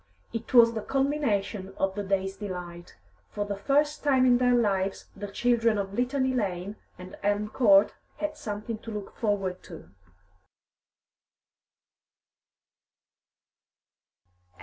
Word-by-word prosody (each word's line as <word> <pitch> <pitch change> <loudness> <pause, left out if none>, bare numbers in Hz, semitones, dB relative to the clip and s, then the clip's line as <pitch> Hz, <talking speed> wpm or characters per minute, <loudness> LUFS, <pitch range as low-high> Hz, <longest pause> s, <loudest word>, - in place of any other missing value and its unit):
It 230 -1 -5
was 235 -2 +7
the 220 - -3
culmination 220 -9 -1
of 195 0 0
the 205 - -3
day's 195 -1 -1
delight. 180 -4 -7 0.3
For 205 -1 -3
the 205 0 -3
first 290 +7 +1
time 265 -3 +4
in 245 -1 +5
their 245 -1 +4
lives 195 -4 0
the 205 +1 -6
children 230 +1 +1
of 195 -1 -3
Litany 260 +3 0
Lane 200 -3 -2 0.2
and 180 0 -10
Elm 205 +1 0
Court 205 -4 +5 0.2
had 305 0 -3
something 215 -5 -5
to 225 - -10
look 210 -2 -7
forward 195 -4 -1
to. 85 - -12
210 Hz, 120 wpm, -27 LUFS, 195-245 Hz, 0.3 s, was